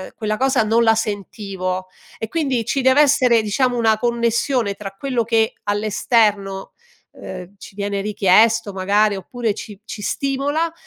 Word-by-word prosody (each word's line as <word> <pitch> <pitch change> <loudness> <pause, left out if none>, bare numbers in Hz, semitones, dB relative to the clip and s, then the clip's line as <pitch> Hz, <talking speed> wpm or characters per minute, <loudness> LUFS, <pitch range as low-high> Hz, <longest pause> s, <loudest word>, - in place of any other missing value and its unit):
quella 215 -1 -2
cosa 265 -3 +2
non 225 +2 +2
la 225 -1 +4
sentivo; 195 -3 -4 0.3
e 225 - -4
quindi 265 -4 -1
ci 275 - 0
dev'essere, 260 -3 +4
diciamo, 245 +4 0
una 220 -2 +3
connessione 235 -1 0
tra 200 0 -8
quello 255 -1 -1
che 225 -1 +1
all'esterno, 205 -1 0 0.4
uhm, 185 0 -9
ci 190 - -12
viene 200 -1 -2
richiesto 210 +2 +3
magari, 200 +2 +2
oppure 220 +3 -3
ci 205 -1 -9
ci 220 - -7
stimola 285 - -1
220 Hz, 140 wpm, -20 LUFS, 200-245 Hz, 0.4 s, la